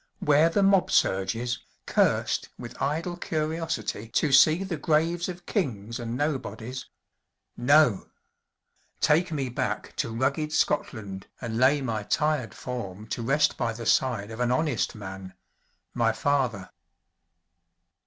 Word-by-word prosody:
where 150 +3 +4
the 195 +4 +2
mob 195 -1 +4
surges, 115 +6 +1 0.3
cursed - - +1
with - - -9
idle 160 +5 -1
curiosity 155 - -3
to 150 +4 +1
see 155 +7 +6
the 190 -3 -3
graves 165 +4 +1
of 180 0 -8
kings 115 - -2
and 120 0 -4
nobodies? 130 -4 -3 0.7
No! 130 -4 +4 0.9
Take 165 +3 +3
me 140 -4 -1
back 125 - -3
to - - -1
rugged 140 +6 -1
Scotland 100 -12 -1
and 115 -1 -3
lay 140 +3 +4
my 115 -5 -2
tired 150 -1 0
form 105 -6 -6
to - - -3
rest 145 +5 +2
by 115 -1 -1
the 115 +1 -7
side 115 -4 +1
of 110 - -8
an 125 -1 +1
honest 145 +1 0
man 95 -2 -8 0.6
my 115 -1 +2
father.' 125 -7 0
130 Hz, 130 wpm, -27 LUFS, 115-155 Hz, 0.9 s, see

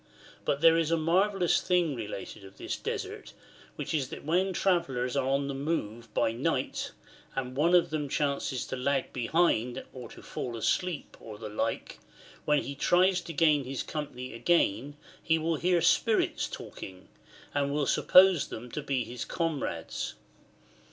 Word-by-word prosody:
But 140 - 0
there 165 0 +6
is 165 -2 0
a 165 - +2
marvellous 180 +3 +2
thing 175 -4 +2
related 105 -3 -6
of 95 0 -14
this - - -3
Desert, - - -5 0.4
which - - -4
is 140 -5 0
that - - -8
when 180 +5 +2
travellers 140 -10 0
are 135 -2 +1
on 140 +1 +1
the 140 - -3
move 120 -6 -3
by - - +2
night, 115 - -2 0.4
and 130 -1 -3
one 165 +6 +4
of 175 - +4
them 150 -2 -2
chances 140 -2 -1
to - - -4
lag 135 +1 -1
behind 125 -2 +1
or 125 -3 -8
to - - -13
fall 120 -2 -5
asleep 175 +7 -1
or 110 -2 -9
the 110 0 -7
like, 105 - -3 0.5
when 150 -1 +3
he 140 - -5
tries 180 +5 +3
to 170 - -7
gain 150 -2 +3
his 130 +1 -4
company 140 -5 -5
again 140 - +1 0.2
he 160 0 +2
v/ill 165 +1 0
hear 175 +2 +2
spirits 225 +5 +2
talking, 95 -1 -9 0.5
and 140 -1 0
will 145 0 0
suppose 185 +3 +5
them 120 +2 -8
to 150 - -3
be 135 -3 -1
his 120 +1 -6
comrades. 150 - -3
140 Hz, 165 wpm, -29 LUFS, 125-165 Hz, 0.5 s, there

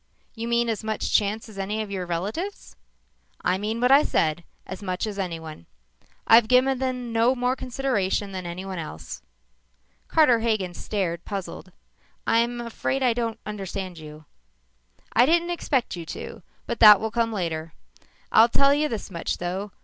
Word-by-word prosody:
"You 230 0 -5
mean 235 0 +2
as 225 -1 -2
much 220 0 -2
chance 210 +2 +1
as 210 -3 -10
any 210 +3 -2
of 205 - -9
your 185 -2 -3
relatives?" 210 - -4 0.7
"I 185 +1 +1
mean 215 +3 -2
what 250 +2 +3
I 280 +2 +8
said 160 - 0 0.2
as 190 - -8
much 185 +1 -2
as 205 -2 -5
anyone. 160 - -5 0.6
I've 225 0 +7
given 255 +2 +3
them 250 -3 -3
no 230 +3 +3
more 250 +1 0
consideration 240 -7 -1
than 185 -2 -5
anyone 185 +1 -5
else." 80 - -7 0.9
Carter 275 -8 +4
Hagen 215 -6 -1
stared, 175 -4 -3
puzzled. 195 -2 -6 0.5
"I'm 235 +1 +2
afraid 240 +3 -2
I 245 -2 +4
don't 230 -1 -3
understand 190 -4 -5
you." 155 0 -11 0.9
"I 240 +3 +5
didn't 340 +2 +2
expect 275 - -1
you 170 - -6
to, - - -7 0.2
but 235 - -4
that 210 -3 +10
will 220 0 -3
come 230 0 0
later. 165 -5 -3 0.6
I'll 225 +2 +7
tell 275 +4 +4
you 300 +1 +1
this 220 -4 -5
much, 170 -2 -3
though. 190 +4 -4
215 Hz, 165 wpm, -25 LUFS, 185-240 Hz, 0.9 s, that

